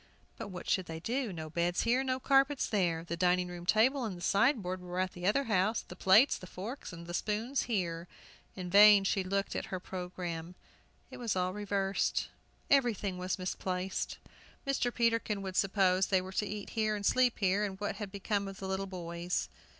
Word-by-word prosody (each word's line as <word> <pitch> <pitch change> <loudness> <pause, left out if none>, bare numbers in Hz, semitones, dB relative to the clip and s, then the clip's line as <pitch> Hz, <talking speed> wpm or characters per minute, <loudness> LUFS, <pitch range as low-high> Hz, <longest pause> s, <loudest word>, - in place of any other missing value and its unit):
But - - -6
what 180 -3 -8
should 190 -2 +1
they 160 0 -6
do? 240 +5 -2
no 160 -3 -6
beds 175 +2 0
here, 245 +3 +2
no 260 -1 -1
carpets 275 +1 +3
there! 175 -6 0
The 170 0 -4
dining 180 +1 +2
room 175 0 -8
table 255 +7 +3
and 185 -6 -5
sideboard 200 -5 +2
were 180 0 -6
at 185 0 0
the 175 +1 -4
other 245 +7 +3
house, 215 -1 +1
the 180 - -11
plates, 215 +9 +5
and 185 - -11
forks, 225 +9 -7
and 170 0 -7
spoons 220 +8 -1
here. 170 -6 -1 0.5
In 180 -2 -6
vain 205 0 +8
she 195 0 +1
looked 195 +1 -2
at - - -3
her 185 - -4
programme. 180 -2 -6 0.6
It - - -8
was 235 -5 -2
all 185 0 0
reversed; 200 -1 -1 0.4
everything 220 -9 +2
was 185 +2 -2
misplaced. 185 0 -3 0.5
Mr. 275 -3 0
Peterkin 230 -4 0
would 190 -1 -5
suppose 190 -1 +3
they 190 - +3
were 185 +1 -7
to 210 - 0
eat 205 0 -6
here 215 -2 0
and 205 -1 -4
sleep 255 +1 +3
here, 195 0 +2
and 195 -2 -4
what 205 - -3
had 210 -3 -6
become 200 0 -2
of 195 -1 -8
the 190 - -6
little 190 +1 -2
boys? 175 -1 -3
195 Hz, 190 wpm, -32 LUFS, 180-215 Hz, 0.6 s, vain